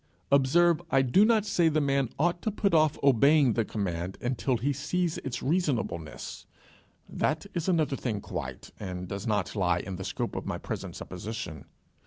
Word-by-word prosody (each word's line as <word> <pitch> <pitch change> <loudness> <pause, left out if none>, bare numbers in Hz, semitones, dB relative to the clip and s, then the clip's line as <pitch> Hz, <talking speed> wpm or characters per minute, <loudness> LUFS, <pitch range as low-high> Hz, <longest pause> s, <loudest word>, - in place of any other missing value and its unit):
Observe 165 +5 +4
I 135 -3 +4
do 135 +11 +5
not 220 -1 +4
say 175 -5 +3
the 155 0 +1
man 140 -3 +1
ought 175 +3 +1
to - - 0
put 200 -2 0
off 155 -2 +4
obeying 140 0 +5
the 115 - +1
command 95 -4 -3
until 125 +1 0
he 140 +5 0
see 155 +6 -1
its 135 -7 -4
reasonableness: 130 - -2 0.6
that 155 +3 -1
is 170 +1 -1
another 155 -6 +2
thing 115 -6 -2
quite, - - -6
and 90 -2 -5
does 100 +5 -5
not 105 -3 0
lie 90 -4 +2
in 95 +1 -5
the 95 - -5
scope 95 - -3
of - - -4
my - - -2
present - - -6
supposition. 90 - -6
135 Hz, 175 wpm, -28 LUFS, 100-160 Hz, 0.6 s, do